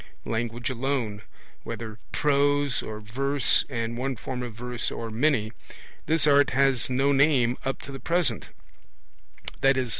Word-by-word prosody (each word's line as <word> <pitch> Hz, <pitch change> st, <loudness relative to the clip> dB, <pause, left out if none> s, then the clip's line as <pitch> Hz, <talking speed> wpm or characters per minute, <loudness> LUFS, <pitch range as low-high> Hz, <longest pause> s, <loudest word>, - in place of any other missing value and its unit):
Language 115 Hz, +2 st, -2 dB
alone 125 Hz, -5 st, -2 dB, 0.4 s
(whether 110 Hz, -2 st, -7 dB
prose 145 Hz, -1 st, +2 dB
or 110 Hz, -1 st, -6 dB
verse, 135 Hz, +6 st, +1 dB
and 115 Hz, -2 st, -3 dB
one 135 Hz, +1 st, -1 dB
form 125 Hz, +2 st, -5 dB
of 120 Hz, -3 st, -6 dB
verse 120 Hz, 0 st, -3 dB
or 115 Hz, -1 st, -5 dB
many): 115 Hz, -2 st, +1 dB, 0.6 s
this 160 Hz, -1 st, +3 dB
art 145 Hz, -1 st, +5 dB
has 135 Hz, -3 st, +3 dB
no 135 Hz, +2 st, +2 dB
name 135 Hz, -4 st, +3 dB
up 135 Hz, -1 st, -3 dB
to 140 Hz, -, -7 dB
the 135 Hz, -, -7 dB
present 165 Hz, -10 st, 0 dB, 1.1 s
(i.e. 135 Hz, -1 st, +3 dB
130 Hz, 140 wpm, -26 LUFS, 115-140 Hz, 1.1 s, art